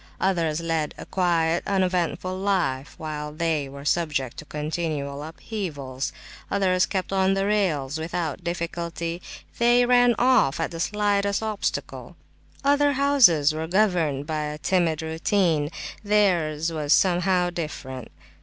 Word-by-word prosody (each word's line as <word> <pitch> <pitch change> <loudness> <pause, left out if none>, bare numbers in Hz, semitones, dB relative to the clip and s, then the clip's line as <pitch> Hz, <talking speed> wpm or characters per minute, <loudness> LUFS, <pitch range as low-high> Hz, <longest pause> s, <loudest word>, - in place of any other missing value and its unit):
Others 170 -4 0
led 165 -2 -1
a - - -8
quiet, 170 -2 +1
uneventful 185 -1 0
life, 185 -9 -1
while 150 -1 -5
they 155 -3 -1
were 140 +1 -10
subject 150 -6 0
to 155 - -8
continual 150 -2 -3
upheavals. 150 - -5 0.4
Others 185 -2 +2
kept 190 -1 -3
on 190 0 +3
the 195 0 0
rails 160 -9 0
without 165 0 -3
difficulty; 170 0 -4 0.4
they 240 +1 +5
ran 245 -1 +5
off 240 - +3
at 165 - -1
the 165 - -6
slightest 200 +2 0
obstacle. 215 -2 -3 0.5
Other 285 +1 +3
houses 240 - +5
were 160 +1 -3
governed 170 -7 +1
by 155 -1 -2
a 150 0 -5
timid 165 -2 +1
routine; 160 -1 +1 0.3
theirs 170 -7 +2
was 155 -2 +1
somehow 180 -1 +2
different. 130 -7 -6
170 Hz, 125 wpm, -25 LUFS, 155-195 Hz, 0.5 s, they